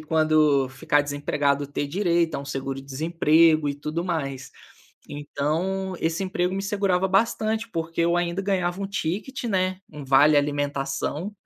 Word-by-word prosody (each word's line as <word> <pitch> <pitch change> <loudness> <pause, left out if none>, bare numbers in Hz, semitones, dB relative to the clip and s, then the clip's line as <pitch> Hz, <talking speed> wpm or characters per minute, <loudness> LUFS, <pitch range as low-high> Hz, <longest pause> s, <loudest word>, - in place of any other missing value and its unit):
quando 155 -3 +3
ficar 140 +2 +1
desempregado, 145 0 -1
ter 145 +1 -3
direito 170 -1 +1
a - - -3
um 140 - -7
seguro 135 -1 -4
desemprego 155 +2 +3
e 140 - -2
tudo 155 +4 -4
mais. 140 -7 -4 0.6
Então, 165 +7 -2
esse 165 +4 -1
emprego 185 -1 -1
me 195 - -2
segurava 195 -2 0
bastante 220 +3 0
porque 165 -1 -2
eu 170 +1 +2
ainda 175 +2 -1
ganhava 190 -1 -1
um 195 - -2
ticket, 200 - -3
né, 185 -3 0
um 150 -2 -8
vale 140 +3 +5
alimentação, 145 +5 -2
165 Hz, 145 wpm, -24 LUFS, 145-185 Hz, 0.6 s, vale